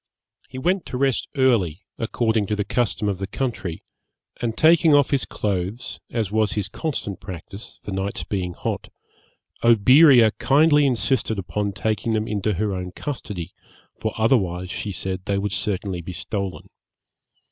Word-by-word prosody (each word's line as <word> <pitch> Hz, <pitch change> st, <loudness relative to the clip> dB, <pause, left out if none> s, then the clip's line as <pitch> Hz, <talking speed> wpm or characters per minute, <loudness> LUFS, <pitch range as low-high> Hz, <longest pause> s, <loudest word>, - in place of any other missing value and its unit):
He -, -, -9 dB
went 180 Hz, +8 st, 0 dB
to 125 Hz, -, -4 dB
rest 135 Hz, -1 st, +1 dB
early, 110 Hz, -, +2 dB, 0.2 s
according 110 Hz, -2 st, 0 dB
to 105 Hz, -, 0 dB
the 105 Hz, -, -1 dB
custom 120 Hz, -3 st, 0 dB
of 100 Hz, -2 st, -1 dB
the 95 Hz, -, -3 dB
country; 105 Hz, -7 st, -3 dB, 0.6 s
and 115 Hz, -2 st, -2 dB
taking 160 Hz, -1 st, +6 dB
off 145 Hz, -2 st, +4 dB
his 140 Hz, -3 st, +1 dB
clothes, 100 Hz, +3 st, -3 dB
as 110 Hz, -5 st, -1 dB
was 110 Hz, -1 st, +2 dB
his 105 Hz, -3 st, -2 dB
constant 140 Hz, -, -3 dB
practice, 95 Hz, +2 st, -9 dB
the -, -, -6 dB
nights 95 Hz, +1 st, -2 dB
being 90 Hz, -3 st, -3 dB
hot, -, -, -4 dB, 0.7 s
Oberea 120 Hz, +2 st, +7 dB
kindly 150 Hz, +1 st, +4 dB
insisted 125 Hz, -3 st, 0 dB
upon 100 Hz, +2 st, -2 dB
taking 110 Hz, +2 st, -1 dB
them 110 Hz, 0 st, 0 dB
into 105 Hz, 0 st, -1 dB
her 105 Hz, +2 st, -1 dB
own 90 Hz, -1 st, -5 dB
custody, 100 Hz, -, -5 dB, 0.4 s
for 110 Hz, -, -3 dB
otherwise, 95 Hz, -6 st, +1 dB
she 105 Hz, -, -4 dB
said, 95 Hz, -1 st, -4 dB
they 100 Hz, -, 0 dB
would 100 Hz, 0 st, -2 dB
certainly 95 Hz, -2 st, -2 dB
be 90 Hz, +2 st, -7 dB
stolen. 100 Hz, +1 st, -4 dB
105 Hz, 155 wpm, -23 LUFS, 95-125 Hz, 0.7 s, Oberea